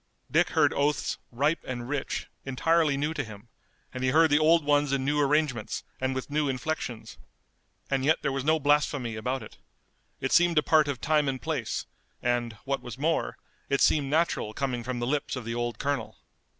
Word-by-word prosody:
Dick - - +3
heard - - +3
oaths, 145 0 0
ripe 145 +7 0
and 120 -2 -5
rich, 145 0 -3 0.2
entirely 150 +2 +2
new 150 +3 -1
to 145 - -2
him, 110 -1 -12 0.4
and 130 0 -4
he 130 - +3
heard 160 +3 +4
the 145 - +5
old 160 0 +4
ones 145 -1 +3
in 135 -1 0
new 150 +1 +1
arrangements 145 -5 0 0.2
and 130 0 -1
with 130 -1 -3
new 150 -1 +1
inflections. 130 -3 -4 0.7
And 135 -1 0
yet 155 +3 +2
there - - +1
was 135 -1 -2
no 155 +2 +3
blasphemy 145 -5 +1
about 125 +3 -2
it. 105 - -13 0.6
It 135 - -2
seemed 175 -1 +4
a 150 - +5
part 155 -1 +4
of 140 -3 -3
time 150 -2 +2
and 130 -1 -3
place, 150 -7 -3 0.3
and, 120 -1 0
what 140 0 -1
was 120 - -8
more, 160 +4 0 0.3
it 140 - +2
seemed 145 -3 +3
natural 155 -8 +1
coming 130 -4 -2
from 125 +1 -3
the 120 - -2
lips 145 +3 -1
of 125 -3 -6
the 115 - -3
old 120 -1 -2
colonel. 140 -5 -2
140 Hz, 195 wpm, -28 LUFS, 125-150 Hz, 0.7 s, the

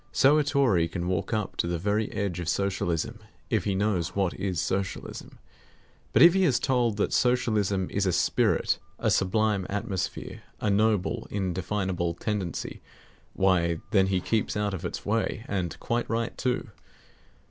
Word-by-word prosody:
So 145 +5 +5
a - - +3
Tory 135 - +2
can 85 +1 -4
walk 90 -2 -1
up 110 -3 -2
to - - 0
the 85 0 -1
very 105 +5 0
edge 100 -4 -2
of 85 -2 -3
Socialism, 90 -5 -1 0.3
if - - +1
he 100 - 0
knows 95 -3 0
what 95 -3 +1
is 95 -3 -2
Socialism. 95 +3 -3 0.7
But - - +6
if 170 0 +9
he 190 0 +3
is 135 -9 +4
told 125 -5 +1
that 105 - 0
Socialism 105 -6 +2
is 100 -1 0
a - - +3
spirit, - - +2 0.2
a - - +1
sublime 100 0 +1
atmosphere, 105 -2 -3 0.2
a 105 - 0
noble, 110 +2 +1
indefinable 95 -2 -2
tendency, 100 -3 -3 0.5
why, 85 -3 +2
then 95 -4 +4
he 95 -1 +1
keeps 110 +2 0
out 105 -1 0
of 95 -1 -5
its - - -5
way; 110 +1 -1
and 90 -4 -3
quite 120 0 -1
right 115 +1 -1
too. 125 -3 -2
100 Hz, 160 wpm, -27 LUFS, 90-110 Hz, 0.7 s, if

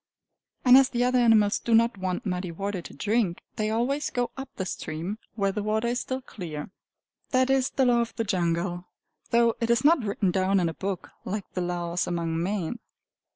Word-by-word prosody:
And 250 +1 +9
as 270 - +3
the 245 0 0
other 250 0 +3
animals 220 -3 +4
do 230 - +2
not 230 +1 +4
want 185 +1 -2
muddy 180 -2 -2
water 195 +2 -3
to - - -11
drink, 205 +2 0 0.2
they 215 0 0
always 250 +6 0
go 245 -1 -1
up 270 0 -7
the 190 - -3
stream, 170 +4 -4 0.2
where 200 -3 +1
the 210 - -3
water 215 +3 0
is 245 +1 0
still 260 0 -3
clear. 165 - -7 0.6
That 260 0 +2
is 265 -1 +2
The 265 - +1
Law 240 -1 +4
of 235 - -4
the 225 - -1
Jungle, 175 -2 -1 0.4
though 235 -1 +4
it 230 - 0
is 235 +2 +3
not 310 -4 +5
written 200 -2 0
down 190 +1 +2
in 170 -2 +1
a - - -5
book, 190 +1 -4
like 200 +1 -3
the 180 - -2
laws 175 0 -2
among 165 -2 -1
men. 195 +3 -2
205 Hz, 200 wpm, -26 LUFS, 180-235 Hz, 0.6 s, And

